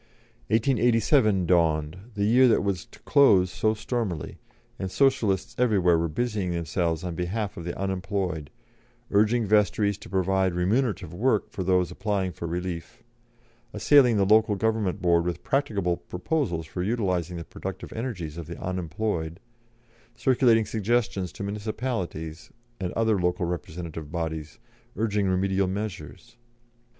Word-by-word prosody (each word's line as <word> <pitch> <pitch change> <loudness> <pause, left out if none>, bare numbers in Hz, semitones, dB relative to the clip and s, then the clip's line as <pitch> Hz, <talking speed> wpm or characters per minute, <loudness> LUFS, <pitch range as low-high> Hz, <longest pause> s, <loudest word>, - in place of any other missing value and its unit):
1887 115 - +3
dawned, 80 -3 +2 0.2
the 100 -1 0
year 125 +4 +6
that 115 - +3
was 100 -4 -2
to - - -16
close 95 -11 +5
so 110 +4 +1
stormily, 105 - -3 0.4
and 95 - -3
Socialists 105 -5 +1
everywhere 100 -8 +4
were 85 0 +1
busying 105 +2 -2
themselves 85 0 -1
on 90 -2 -3
behalf 95 +5 -3
of 85 - -7
the 85 - -4
unemployed, 95 -5 -2 0.6
urging 110 +3 +3
vestries 105 -1 +2
to - - -12
provide 95 -1 +1
remunerative 100 - 0
work 110 +3 +1
for 95 - -4
those 90 -1 +2
applying 100 -2 -1
for 85 - -6
relief, 85 0 -5 0.7
assailing 130 -6 +5
the 100 - +3
Local 105 +1 +4
Government 110 -3 -1
Board 85 -1 +4
with 85 -1 -3
practicable 100 -11 0
proposals 90 - -2
for 90 +3 -5
utilising 90 -5 -1
the 85 - -5
productive - - -7
energies 95 - -5
of 80 - -7
the - - -8
unemployed, 90 -1 -3 0.8
circulating 120 -3 +3
suggestions 105 -3 0
to - - -6
municipalities 100 -6 -4 0.3
and 90 -2 -2
other 110 -3 +2
local 90 +1 0
representative 80 -3 -5
bodies, 80 -3 -4 0.4
urging 105 -1 0
remedial 95 +1 +1
measures. 100 +1 -6
95 Hz, 135 wpm, -26 LUFS, 85-110 Hz, 0.8 s, year